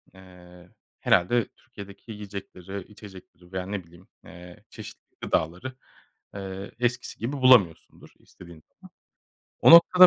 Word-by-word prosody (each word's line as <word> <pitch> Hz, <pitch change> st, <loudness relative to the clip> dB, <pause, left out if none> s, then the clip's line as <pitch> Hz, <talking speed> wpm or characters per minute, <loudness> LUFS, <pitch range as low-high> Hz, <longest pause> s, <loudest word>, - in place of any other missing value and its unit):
eee, 90 Hz, -1 st, -16 dB, 0.3 s
herhâlde 120 Hz, +7 st, +3 dB
Türkiye'deki 100 Hz, -3 st, -12 dB
yiyecekleri, 100 Hz, -2 st, -8 dB
içecekleri 95 Hz, -4 st, -14 dB
veya 95 Hz, -1 st, -3 dB
ne 100 Hz, -1 st, -4 dB
bileyim, 85 Hz, +2 st, -19 dB, 0.2 s
eee, 90 Hz, 0 st, -13 dB
çeşitli -, -, -12 dB
gıdaları, 90 Hz, +11 st, -1 dB, 0.6 s
eee, 95 Hz, 0 st, -6 dB
eskisi 125 Hz, 0 st, -1 dB
gibi 115 Hz, +6 st, -3 dB
bulamıyorsundur 125 Hz, -, +3 dB
istediğin 85 Hz, -3 st, -15 dB
zaman. -, -, -18 dB, 0.7 s
O -, -, +7 dB
noktada 180 Hz, +2 st, +10 dB
95 Hz, 115 wpm, -26 LUFS, 90-115 Hz, 0.7 s, noktada